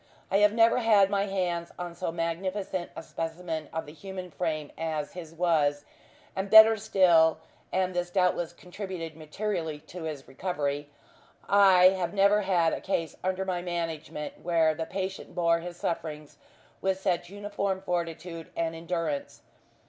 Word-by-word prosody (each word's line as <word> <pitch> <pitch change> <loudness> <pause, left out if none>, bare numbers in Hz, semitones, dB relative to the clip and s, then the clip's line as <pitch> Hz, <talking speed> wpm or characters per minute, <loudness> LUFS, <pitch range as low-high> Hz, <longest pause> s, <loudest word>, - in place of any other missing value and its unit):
I 195 - +4
have 210 0 +5
never 230 +2 +5
had 210 -4 +4
my 200 0 +1
hands 175 -3 -2
on 175 -1 -5
so 170 0 -3
magnificent 175 +2 -3
a - - -7
specimen 165 -1 -4
of 160 - -3
the 150 - -11
human 185 +1 -8
frame 155 -4 -3
as 155 -2 -3
his 170 -3 -8
was; 155 -4 +1 0.5
and 195 +1 -2
better 220 +1 +10
still 175 -6 +4 0.3
and 185 0 0
this 175 0 -1
doubtless 180 -2 +1
contributed 180 -2 -7
materially 160 0 -3
to 165 +2 -8
his 150 -4 -6
recovery 145 -2 -3 0.6
I 190 -2 +7
have 185 -1 -2
never 200 +1 +5
had 175 -4 +2
a - - -3
case 165 -4 -2
under 185 +1 -1
my 180 -2 -1
management 165 -4 -4
where 165 -2 +3
the 160 +1 -4
patient 190 0 -5
bore 170 -1 +3
his 175 +1 -7
sufferings 155 -4 -4 0.4
with 190 0 0
such 175 -2 -1
uniform 200 -1 -2
fortitude 170 -2 -4
and 165 -1 0
endurance. 165 -3 -3
175 Hz, 150 wpm, -28 LUFS, 165-190 Hz, 0.6 s, better